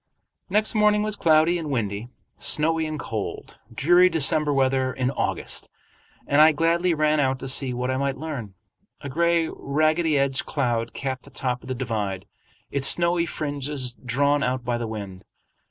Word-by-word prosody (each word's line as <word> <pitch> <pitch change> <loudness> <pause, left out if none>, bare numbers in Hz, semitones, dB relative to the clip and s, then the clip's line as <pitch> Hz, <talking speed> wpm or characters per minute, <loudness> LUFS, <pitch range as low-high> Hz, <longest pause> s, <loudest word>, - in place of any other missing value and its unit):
Next 210 +3 +1
morning 210 -1 +3
was 215 -1 -1
cloudy 165 -1 +3
and 155 -3 -5
windy, 110 -4 -3 0.3
snowy 160 +1 +2
and 155 -1 -5
cold, 110 -7 -6
dreary 175 +10 +4
December 155 -2 +2
weather 130 -1 +1
in 130 +1 -2
August, - - -2 0.6
and 145 +1 +3
I 155 0 +7
gladly 170 +3 +1
ran 155 0 +2
out 135 -2 +1
to 130 - -7
see 130 0 +1
what 125 +1 -2
I 130 - -1
might 140 0 -2
learn. 130 -10 -6 0.5
A 140 - -6
gray 170 +2 +1
ragged 155 +4 0
edged 140 -3 +1
cloud 120 -5 -1
capped 130 -2 -4
the - - -17
top 125 -2 -3
of - - -14
the 130 - -3
divide, 105 -7 -3 0.5
its 135 -1 +5
snowy 170 0 +3
fringes 145 -4 -2
drawn 140 +4 0
out 125 -1 -2
by 120 -1 -1
the 115 - -3
wind. 100 -4 -7
140 Hz, 170 wpm, -24 LUFS, 125-160 Hz, 0.6 s, I